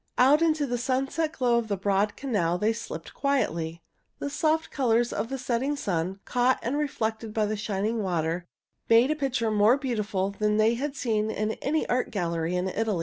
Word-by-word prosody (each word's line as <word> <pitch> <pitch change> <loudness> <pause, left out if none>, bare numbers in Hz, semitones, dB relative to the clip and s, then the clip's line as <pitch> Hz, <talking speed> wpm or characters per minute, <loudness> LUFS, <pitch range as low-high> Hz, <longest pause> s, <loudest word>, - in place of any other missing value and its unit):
Out 275 +5 +5
into 310 -3 +2
the 245 -2 -2
sunset 270 +5 -1
glow 245 -5 +2
of 230 - -4
the 200 -2 -1
broad 200 +2 +1
canal 200 -11 0
they 215 +4 +1
slipped 225 -8 -7
quietly. 170 - -1 0.3
The 285 - -4
soft 315 +2 0
colors 240 -3 +1
of 230 - -2
the 270 - -3
setting 260 +3 -1
sun, 190 - -2
caught 250 +1 +2
and 240 +4 -1
reflected 225 -7 -2
by 215 -1 +2
the 215 +1 -1
shining 210 +2 -1
water, 175 -2 -1 0.4
made 235 +5 +6
a - - +1
picture 260 -6 -1
more 215 +4 +5
beautiful 210 -8 -1
than 210 +1 0
they 215 +2 +4
had 275 +4 -3
seen 220 -5 0
in 215 0 -1
any 310 +3 0
art 250 +1 0
gallery 170 -3 -1
in 180 +1 0
Italy. 210 -1 -1
225 Hz, 190 wpm, -27 LUFS, 200-265 Hz, 0.4 s, made